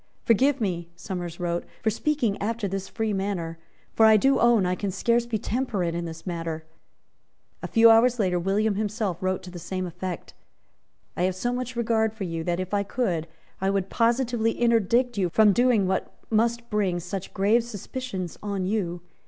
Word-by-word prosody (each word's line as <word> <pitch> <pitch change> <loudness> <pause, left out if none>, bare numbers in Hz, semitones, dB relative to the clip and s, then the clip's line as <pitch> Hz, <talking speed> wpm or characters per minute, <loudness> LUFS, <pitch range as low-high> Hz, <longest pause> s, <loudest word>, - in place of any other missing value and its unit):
"Forgive 265 +5 +3
me," 175 -6 -2
Somers 175 -2 -6
wrote, 175 -1 -1 0.2
"for 220 - +2
speaking 245 -3 0
after 220 0 -1
this 195 0 -4
free 220 -1 -2
manner; 185 -4 -3 0.3
for 220 - +6
I 220 0 +7
do 270 +6 +3
own 235 -5 +4
I 180 - +1
can 200 +2 -2
scarce 235 +5 +1
be 230 -2 -1
temperate 210 -7 -1
in 170 0 -3
this 165 -1 -8
matter." 165 -3 -4 1.0
A - - -4
few 225 0 +6
hours 235 +2 +5
later 185 -5 +1
William 200 +4 +1
himself 205 -3 -2
wrote 185 0 -1
to 180 - -9
the 175 - -8
same 185 +2 -4
effect. 180 0 -6 0.8
"I - - -3
have 185 0 +1
so 240 +6 -1
much 255 0 -4
regard 220 -2 +1
for 215 - -5
you, 165 -3 -3
that, 175 0 0
if 185 +1 -4
I 205 - +2
could, 195 -6 -1 0.3
I 190 - +2
would 195 -1 -1
positively 235 -1 +1
interdict 235 0 +2
you 180 -2 +1
from 210 +3 +5
doing 240 -3 +3
what 190 0 -1 0.2
must 235 +2 +1
bring 195 -4 +1
such 185 +2 -6
grave 210 +5 +3
suspicions 230 -4 -6
on 200 -3 -2
you. 180 -4 -1
200 Hz, 185 wpm, -26 LUFS, 180-230 Hz, 1.0 s, I